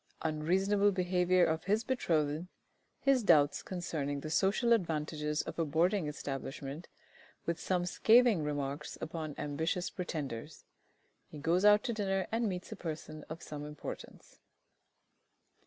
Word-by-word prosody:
Unreasonable 190 Hz, +6 st, +2 dB
behaviour 180 Hz, -1 st, +3 dB
of 160 Hz, +1 st, -1 dB
his 210 Hz, +4 st, +2 dB
betrothed. 165 Hz, -, 0 dB, 0.5 s
His 275 Hz, -2 st, +4 dB
doubts 145 Hz, -8 st, +4 dB
concerning 155 Hz, -6 st, -3 dB
the 155 Hz, -, -5 dB
social 215 Hz, +7 st, +3 dB
advantages 155 Hz, -5 st, -1 dB
of -, -, -7 dB
a -, -, +3 dB
Boarding 165 Hz, +4 st, +1 dB
Establishment, 140 Hz, +1 st, -5 dB, 0.6 s
with 170 Hz, -1 st, -1 dB
some 180 Hz, +1 st, 0 dB
scathing 225 Hz, 0 st, +5 dB
remarks 145 Hz, 0 st, -3 dB
upon 155 Hz, -2 st, -5 dB
ambitious 160 Hz, +5 st, -2 dB
pretenders. 150 Hz, -6 st, -5 dB, 0.6 s
He -, -, -10 dB
goes 170 Hz, +6 st, +2 dB
out 210 Hz, 0 st, +7 dB
to 235 Hz, -, -1 dB
dinner, 195 Hz, -3 st, 0 dB
and 225 Hz, -1 st, +1 dB
meets 180 Hz, +1 st, -5 dB
a -, -, -4 dB
person 155 Hz, -3 st, -6 dB
of 160 Hz, +2 st, -7 dB
some 150 Hz, -1 st, -6 dB
importance. 150 Hz, -1 st, -9 dB
165 Hz, 130 wpm, -33 LUFS, 150-195 Hz, 0.6 s, out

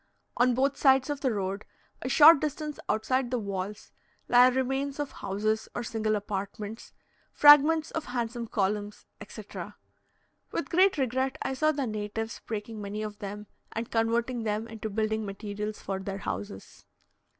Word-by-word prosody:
On 245 Hz, 0 st, +3 dB
both 275 Hz, +2 st, +1 dB
sides 265 Hz, 0 st, +4 dB
of 290 Hz, -, -4 dB
the 260 Hz, -, +1 dB
road, 195 Hz, -1 st, -3 dB, 0.4 s
a 255 Hz, -, -3 dB
short 300 Hz, +2 st, +8 dB
distance 300 Hz, 0 st, -4 dB
outside 240 Hz, +4 st, +1 dB
the 250 Hz, -, 0 dB
walls, 200 Hz, -1 st, -5 dB, 0.4 s
lie 245 Hz, +1 st, +7 dB
remains 270 Hz, +2 st, -1 dB
of 290 Hz, -1 st, -3 dB
houses 215 Hz, +3 st, -2 dB
or 240 Hz, -, -2 dB
single 220 Hz, -2 st, -1 dB
apartments, 205 Hz, +2 st, -5 dB, 0.4 s
fragments 295 Hz, +2 st, +6 dB
of 320 Hz, -, -3 dB
handsome 240 Hz, -1 st, -3 dB
columns, 205 Hz, 0 st, -2 dB, 0.2 s
etc. -, -, -8 dB, 0.8 s
With -, -, -3 dB
great 375 Hz, +2 st, +4 dB
regret 260 Hz, 0 st, 0 dB
I -, -, -2 dB
saw 310 Hz, +4 st, +2 dB
the 280 Hz, -3 st, -2 dB
natives 215 Hz, 0 st, -4 dB
breaking 215 Hz, 0 st, -5 dB
many 205 Hz, +1 st, -4 dB
of 210 Hz, -1 st, -6 dB
them, 205 Hz, +1 st, -6 dB, 0.3 s
and 230 Hz, +1 st, -4 dB
converting 230 Hz, +2 st, 0 dB
them 215 Hz, 0 st, -2 dB
into 220 Hz, -1 st, -6 dB
building 220 Hz, +1 st, -1 dB
materials 210 Hz, +1 st, -5 dB
for 195 Hz, -1 st, -3 dB
their 195 Hz, 0 st, -5 dB
houses. 100 Hz, -, -7 dB
225 Hz, 150 wpm, -28 LUFS, 210-265 Hz, 0.8 s, short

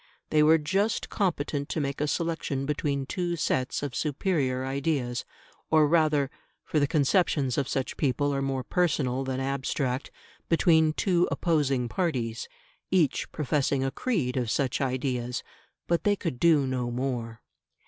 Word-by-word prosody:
They 155 Hz, -, +4 dB
were 155 Hz, +2 st, +6 dB
just 195 Hz, +8 st, 0 dB
competent 145 Hz, -7 st, -1 dB
to -, -, -2 dB
make 140 Hz, -1 st, -2 dB
a 150 Hz, -, +1 dB
selection 160 Hz, -4 st, -1 dB
between 140 Hz, -1 st, -1 dB
two 175 Hz, +3 st, -2 dB
sets 130 Hz, -4 st, -1 dB
of 140 Hz, -3 st, -3 dB
superior 140 Hz, -3 st, 0 dB
ideas; 135 Hz, -3 st, -1 dB, 0.4 s
or 155 Hz, -1 st, +5 dB
rather 150 Hz, -3 st, +2 dB, 0.3 s
for 155 Hz, -, 0 dB
the 145 Hz, -, +2 dB
conceptions 145 Hz, -3 st, +2 dB
of 140 Hz, -2 st, 0 dB
such 135 Hz, -, -2 dB
people 145 Hz, +1 st, +1 dB
are 135 Hz, -, -1 dB
more 135 Hz, -1 st, -1 dB
personal 135 Hz, -6 st, 0 dB
than 130 Hz, -1 st, -2 dB
abstract 135 Hz, -1 st, -2 dB, 0.4 s
between 160 Hz, -2 st, +4 dB
two 175 Hz, 0 st, +2 dB
opposing 140 Hz, -7 st, +1 dB
parties, 120 Hz, -, -2 dB, 0.4 s
each 170 Hz, -7 st, +1 dB
professing 140 Hz, -2 st, 0 dB
a 135 Hz, -, -1 dB
creed 150 Hz, -, -1 dB
of 120 Hz, -3 st, 0 dB
such 130 Hz, +4 st, 0 dB
ideas. 125 Hz, -2 st, -2 dB, 0.4 s
But 170 Hz, -1 st, 0 dB
they 205 Hz, -1 st, +3 dB
could 165 Hz, -10 st, -4 dB
do 160 Hz, -5 st, +4 dB
no 130 Hz, -2 st, -2 dB
more. 120 Hz, -2 st, -3 dB
140 Hz, 150 wpm, -27 LUFS, 130-160 Hz, 0.4 s, were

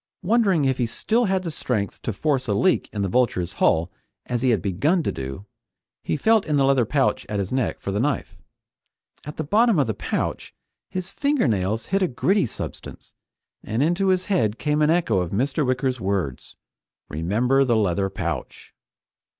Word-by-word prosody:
Wondering 195 Hz, -6 st, +3 dB
if 130 Hz, -1 st, 0 dB
he 120 Hz, -, +1 dB
still 225 Hz, -, 0 dB
had 190 Hz, -2 st, 0 dB
the 170 Hz, -, -3 dB
strength 110 Hz, -8 st, -3 dB
to -, -, -2 dB
force 130 Hz, +4 st, -1 dB
a 100 Hz, -, +1 dB
leak 185 Hz, -, +2 dB
in 100 Hz, -2 st, -2 dB
the -, -, 0 dB
Vulture's 95 Hz, -6 st, 0 dB
hull, 85 Hz, +2 st, +3 dB, 0.3 s
as 120 Hz, -1 st, -2 dB
he 130 Hz, -, +2 dB
had 110 Hz, -4 st, +3 dB
begun 140 Hz, -, +1 dB
to -, -, 0 dB
do, 65 Hz, +9 st, -6 dB, 0.6 s
he -, -, -2 dB
felt 220 Hz, +6 st, +3 dB
in 150 Hz, -2 st, +1 dB
the 135 Hz, -, +3 dB
leather 135 Hz, -3 st, +3 dB
pouch 135 Hz, +3 st, +1 dB
at 105 Hz, -, -2 dB
his 100 Hz, -2 st, -2 dB
neck 130 Hz, -1 st, -1 dB
for 100 Hz, -, -4 dB
the 100 Hz, -, -1 dB
knife. 145 Hz, +4 st, -1 dB, 0.9 s
At 150 Hz, -, -8 dB
the 160 Hz, -, -2 dB
bottom 215 Hz, +6 st, +3 dB
of 145 Hz, -, +3 dB
the 110 Hz, -, -1 dB
pouch -, -, -3 dB, 0.3 s
his 185 Hz, -1 st, -5 dB
fingernails 115 Hz, -, 0 dB
hit 195 Hz, +1 st, 0 dB
a 185 Hz, -, +3 dB
gritty 185 Hz, +5 st, +1 dB
substance, -, -, -8 dB, 0.5 s
and 115 Hz, +6 st, -1 dB
into 175 Hz, +5 st, +1 dB
his 185 Hz, -1 st, +2 dB
head 115 Hz, -, +1 dB
came 150 Hz, 0 st, 0 dB
an 150 Hz, -, +4 dB
echo 160 Hz, -, +2 dB
of 90 Hz, -2 st, -2 dB
Mr. 135 Hz, -, 0 dB
Wicker's 130 Hz, -1 st, -1 dB
words: 95 Hz, -9 st, -3 dB, 0.5 s
"Remember 110 Hz, -, +1 dB
the 120 Hz, -3 st, +2 dB
leather 95 Hz, -1 st, +1 dB
pouch!" 85 Hz, -8 st, -5 dB
130 Hz, 185 wpm, -23 LUFS, 100-165 Hz, 0.9 s, an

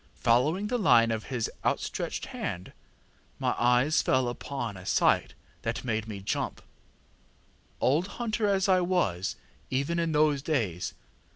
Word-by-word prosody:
Following 150 Hz, -, +2 dB
the 245 Hz, +3 st, -1 dB
line 115 Hz, -, +5 dB
of 110 Hz, -1 st, -3 dB
his 120 Hz, -4 st, -2 dB, 0.2 s
outstretched -, -, -2 dB
hand, 90 Hz, +1 st, -5 dB, 0.6 s
my -, -, 0 dB
eyes 125 Hz, +5 st, +4 dB
fell 130 Hz, -1 st, +2 dB
upon 120 Hz, -3 st, -5 dB
a 95 Hz, -, -10 dB
sight -, -, +2 dB, 0.3 s
that -, -, -3 dB
made 110 Hz, -3 st, -2 dB
me 100 Hz, -3 st, -6 dB
jump, 95 Hz, -, -3 dB, 1.2 s
old 155 Hz, +8 st, +2 dB
hunter 225 Hz, -2 st, 0 dB
as 195 Hz, 0 st, +2 dB
I 185 Hz, -1 st, +4 dB
was 175 Hz, -, 0 dB, 0.3 s
even 140 Hz, +6 st, 0 dB
in 165 Hz, -1 st, 0 dB
those 150 Hz, -2 st, +3 dB
days. 115 Hz, -, -1 dB
135 Hz, 135 wpm, -28 LUFS, 115-170 Hz, 1.2 s, line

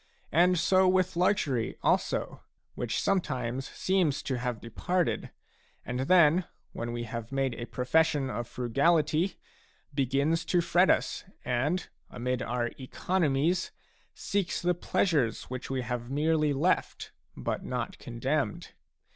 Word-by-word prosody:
And 180 Hz, +3 st, +4 dB
so 185 Hz, +2 st, +4 dB
with 185 Hz, -1 st, +2 dB
luxury, 170 Hz, -, +1 dB
also, -, -, 0 dB, 0.3 s
which 120 Hz, -2 st, -2 dB
sometimes 135 Hz, -9 st, -1 dB
seems 185 Hz, -7 st, 0 dB
to 130 Hz, -3 st, -2 dB
have 125 Hz, -2 st, -2 dB
departed, 175 Hz, +11 st, -1 dB, 0.6 s
and 125 Hz, 0 st, -3 dB
then 170 Hz, +4 st, +5 dB, 0.3 s
when 120 Hz, 0 st, -4 dB
we 120 Hz, 0 st, -3 dB
have 115 Hz, 0 st, -6 dB
made 135 Hz, -2 st, 0 dB
a 120 Hz, 0 st, -6 dB
profession 145 Hz, +2 st, +1 dB
of 120 Hz, -2 st, -4 dB
frugality, 155 Hz, -, +1 dB, 0.6 s
begins 140 Hz, +4 st, +1 dB
to 180 Hz, -, +2 dB
fret 175 Hz, +2 st, +3 dB
us -, -, +1 dB, 0.2 s
and, 145 Hz, +9 st, 0 dB, 0.2 s
amid 125 Hz, +1 st, -2 dB
our 120 Hz, 0 st, -1 dB
economies, 160 Hz, +3 st, 0 dB, 0.5 s
seeks 200 Hz, -3 st, -1 dB
the 180 Hz, 0 st, +2 dB
pleasures 155 Hz, -, +1 dB
which 130 Hz, -1 st, -5 dB
we 130 Hz, -1 st, -1 dB
have 120 Hz, 0 st, -4 dB
merely 155 Hz, +2 st, +2 dB
left 155 Hz, +7 st, 0 dB, 0.3 s
but -, -, -3 dB
not -, -, -4 dB
condemned. 130 Hz, 0 st, -2 dB
140 Hz, 125 wpm, -29 LUFS, 125-175 Hz, 0.6 s, then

